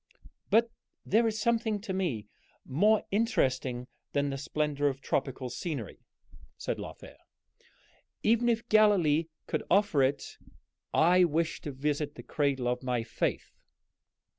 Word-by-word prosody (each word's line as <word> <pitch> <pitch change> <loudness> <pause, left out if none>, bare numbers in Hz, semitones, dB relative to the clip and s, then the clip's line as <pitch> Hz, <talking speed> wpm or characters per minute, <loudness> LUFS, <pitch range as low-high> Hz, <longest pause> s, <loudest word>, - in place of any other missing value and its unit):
"But 230 +2 +4 0.3
there 225 +3 +3
is 220 0 -2
something 225 -2 +1
to 195 -2 -4
me 150 - -2 0.4
more 205 +11 +3
interesting 130 - 0 0.3
than 140 0 +1
the 135 - -3
splendor 145 0 -1
of 135 -1 -1
tropical 130 -2 -2
scenery," 130 - -5 0.6
said - - -3
Lothair, - - -9 1.1
"even 235 +2 +3
if 235 0 0
Galilee 190 -8 +4 0.2
could - - -2
offer 200 -6 +3
it. 135 +2 -1 0.5
I 180 +3 +5
wish 165 0 0
to 145 - -5
visit 145 +2 -2
the - - -9
cradle 140 -4 0
of 125 0 -1
my 125 -3 -1
faith." 115 -1 -2
150 Hz, 130 wpm, -30 LUFS, 135-210 Hz, 1.1 s, I